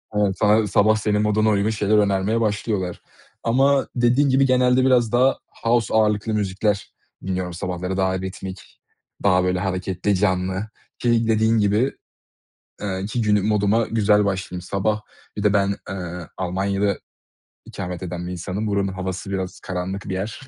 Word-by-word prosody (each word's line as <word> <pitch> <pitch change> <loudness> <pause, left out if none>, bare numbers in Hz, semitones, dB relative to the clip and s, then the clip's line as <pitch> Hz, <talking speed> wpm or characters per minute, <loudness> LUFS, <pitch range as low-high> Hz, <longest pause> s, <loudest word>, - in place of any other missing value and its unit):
evet 100 -2 +1
sa 105 +1 +4
sabah 110 +2 +4
senin 105 -1 0
moduna 105 +1 +2
uygun 105 +1 +2
şeyler 105 -1 +1
önermeye 100 +2 +2
başlıyorlar. 105 -4 -1 0.4
Ama 135 +4 +3
dediğin 125 +4 +3
gibi 135 +1 +4
genelde 130 0 +3
biraz 120 -4 +3
daha 130 +2 +3 0.3
house 115 -2 +2
ağırlıklı 110 0 +2
müzikler 100 0 -1 0.3
dinliyorum 90 -2 -2
sabahları 90 +1 -3
daha 95 -1 +1
ritmik, 95 0 -8 0.4
daha 90 -2 +4
böyle 90 0 0
hareketli, 95 +1 -1
canlı. 95 +1 0 0.3
Ki 115 -1 +2
dediğin 110 +1 +3
gibi, 105 +5 +2 0.9
eee, 95 -1 -3
ki 115 +2 -2
günü 105 -2 +2
moduma 105 +2 +2
güzel 105 -2 +3
başlayayım. 95 -2 -2
Sabah 105 +3 -1 0.4
bir 105 - -3
de 105 -1 +3
ben, 100 -1 +2
eee, 90 -3 -6
Almanya'da 95 +2 -1 0.7
ikamet 90 -2 -6
eden 90 -1 -5
bir - - -4
insanım. 95 +4 -4
Buranın 100 -1 0
havası 95 +1 -5
biraz 95 -1 -4
karanlık 95 +2 -4
bir - - -2
yer. 105 +8 -4
100 Hz, 150 wpm, -22 LUFS, 95-110 Hz, 0.9 s, sa